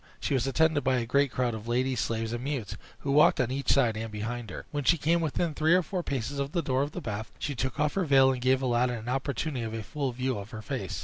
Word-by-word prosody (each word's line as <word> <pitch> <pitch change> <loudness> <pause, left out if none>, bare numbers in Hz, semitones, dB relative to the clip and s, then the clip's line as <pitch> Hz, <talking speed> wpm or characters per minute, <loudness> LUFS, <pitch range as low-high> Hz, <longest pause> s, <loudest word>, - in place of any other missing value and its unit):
She - - -1
was 130 -1 +1
attended 155 +2 +2
by 130 0 +2
a 120 - -1
great 140 +4 +2
crowd 125 -2 0
of 110 0 -7
ladies, 125 +1 0
slaves, 115 -1 -1
and 120 +1 -4
mutes, 125 -8 -3 0.3
who 140 - -2
walked 150 +2 +5
on 125 -1 +1
each 140 +1 0
side 120 -5 +3
and 110 0 -4
behind 110 +2 -4
her. 90 - -7
When 145 -1 -2
she 170 +7 +4
came 165 +3 +2
within 160 +1 -1
three 155 +3 +3
or 180 - +3
four 180 +3 -3
paces 140 -2 -3
of 140 +1 -2
the 170 - 0
door 130 0 +1
of 145 +1 -2
the 180 - -5
bath, 110 -5 -5
she 145 - -3
took 130 +1 -3
off 150 0 +2
her 195 -2 0
veil, 135 -2 +5
and 125 -1 -3
gave 130 +1 +2
Aladdin 120 -1 +1
an 110 +2 -7
opportunity 135 0 -2
of 110 0 -4
a 110 - -4
full 140 +1 -3
view 125 -1 -2
of 100 +1 -8
her 110 -2 -8
face. - - -4
130 Hz, 275 wpm, -28 LUFS, 120-145 Hz, 0.3 s, walked